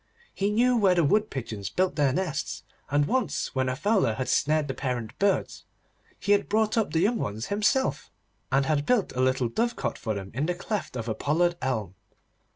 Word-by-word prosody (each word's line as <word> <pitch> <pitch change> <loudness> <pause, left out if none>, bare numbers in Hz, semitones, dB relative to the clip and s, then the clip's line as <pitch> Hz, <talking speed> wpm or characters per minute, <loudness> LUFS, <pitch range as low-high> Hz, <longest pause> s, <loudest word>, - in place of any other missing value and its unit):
He 200 +1 0
knew 245 +4 +3
where 195 -5 +4
the 170 - +3
wood 210 +8 +2
pigeons 115 -6 -5
built 185 0 0
their 145 -3 +3
nests, 175 +1 -2 0.3
and 145 +2 +2
once 210 - -1
when 130 -1 0
a 130 - -1
fowler 195 - +1
had 130 +2 -3
snared 155 +1 +2
the 135 - -2
parent 125 -4 -3
birds, 200 -1 0 0.6
he 205 - -1
had 205 0 +3
brought 215 0 +2
up 225 -2 +1
the 160 - +1
young 220 +5 +2
ones 105 +3 -4
himself, 210 +6 +1 0.4
and 135 +1 +3
had 150 -1 0
built 245 -6 +2
a 130 - 0
little 130 -1 +2
dovecot 235 - -2
for 110 -3 -2
them 95 -1 -6
in 140 +6 -1
the 180 - 0
cleft 205 -4 -4
of 115 -2 -4
a 110 - 0
pollard 170 +9 +1
elm. 110 -8 -2
150 Hz, 200 wpm, -27 LUFS, 130-205 Hz, 0.6 s, where